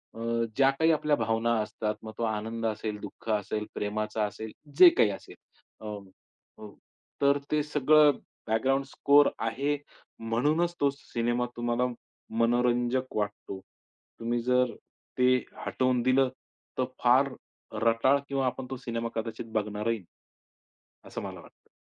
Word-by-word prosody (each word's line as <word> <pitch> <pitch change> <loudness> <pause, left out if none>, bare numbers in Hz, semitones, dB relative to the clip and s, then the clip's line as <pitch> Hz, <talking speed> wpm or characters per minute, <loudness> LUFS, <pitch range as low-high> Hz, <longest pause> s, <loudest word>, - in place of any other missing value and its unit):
अ, - - -9
अ, 115 0 0
ज्या 135 0 +5
काही 160 +4 +3
आपल्या 150 -1 +2
भावना 115 0 +1
असतात. 105 0 -3
मग 110 - -7
तो 115 - -2
आनंद 110 +1 -2
असेल, 110 -1 -2
दुःख 105 +2 -9
असेल, 105 0 -1
प्रेमाचा 105 +1 -2
असेल, 110 +1 -6 0.3
जे 180 -2 +12
काही 105 - +5
असेल - - -9 0.5
अ, 110 - -7 0.7
अ, 105 - -9 0.5
तर 140 0 +5
ते 150 0 +3
सगळं 150 0 +4 0.3
बॅकग्राउंड 135 +5 +1
स्कोर 140 +1 +4
आहे, 135 +6 0 0.4
म्हणूनच 150 +10 +1
तो 140 - +4
सिनेमा 120 -2 -1
तुम्हाला 120 +1 0 0.5
मनोरंजक 120 +2 +1
वाटतो. 105 -2 -3 0.6
तुम्ही 120 +1 -1
जर 125 0 +2 0.4
ते 125 0 +4 0.4
हटवून 130 -1 +1
दिलं, 130 +1 +3 0.5
तर 130 - +2 0.2
फार 130 +3 +5 0.5
रटाळ 115 +5 +4
किंवा 135 -1 0
आपण 130 +1 -2
तो 130 - -4
सिनेमा 115 -2 -3
कदाचित 115 0 -4
बघणारही 105 +1 -1
नाही. 90 - -19 1.0
असं - - -6
मला - - -7
वाटतं. - - -19
120 Hz, 135 wpm, -28 LUFS, 110-135 Hz, 1.0 s, जे